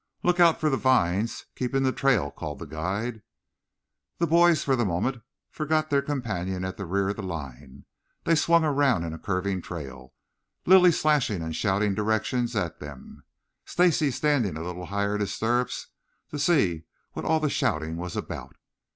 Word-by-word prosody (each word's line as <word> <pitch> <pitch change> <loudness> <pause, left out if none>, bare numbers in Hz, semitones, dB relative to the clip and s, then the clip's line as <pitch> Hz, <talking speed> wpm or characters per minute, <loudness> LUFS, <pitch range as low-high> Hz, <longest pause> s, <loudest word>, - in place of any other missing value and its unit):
"Look 180 0 +2
out 170 -2 +5
for 155 -1 +1
the 135 - +1
vines. 115 -4 +1
Keep 125 +1 -3
in 135 - +2
the 130 - +2
trail," 125 - +1
called 75 -2 -6
the - - -8
guide. 100 +9 -3 1.0
The 170 - +1
boys, 170 -1 +4
for 135 - +2
the 120 - +1
moment, 110 +7 -1 0.3
forgot 155 0 -1
their 140 -1 +3
companion 105 -10 -3
at 95 0 -4
the 100 - -5
rear 95 +2 0
of 100 - -3
the - - -4
line. 70 -6 -8 0.4
They 165 - +2
swung 170 +1 +4
around 140 - +2
in 80 -1 -4
a 80 - -8
curving 95 -1 -2
trail, 65 -7 -8 0.5
Lilly 180 -1 +7
slashing 145 - +1
and 80 -1 -4
shouting 100 0 +1
directions 110 +4 0
at 90 -6 -2
them, 70 -3 -11 0.4
Stacy 170 -4 +2
standing 130 - 0
a 80 - -5
little 90 0 -6
higher 100 +1 -1
in 105 - -1
his 100 -2 -2
stirrups 120 +2 -1 0.4
to 150 - -4
see 100 - +2 0.3
what - - -5
all 160 0 +2
the 155 - 0
shouting 80 +1 -1
was 90 0 -5
about. - - -6
105 Hz, 175 wpm, -26 LUFS, 90-145 Hz, 1.0 s, Lilly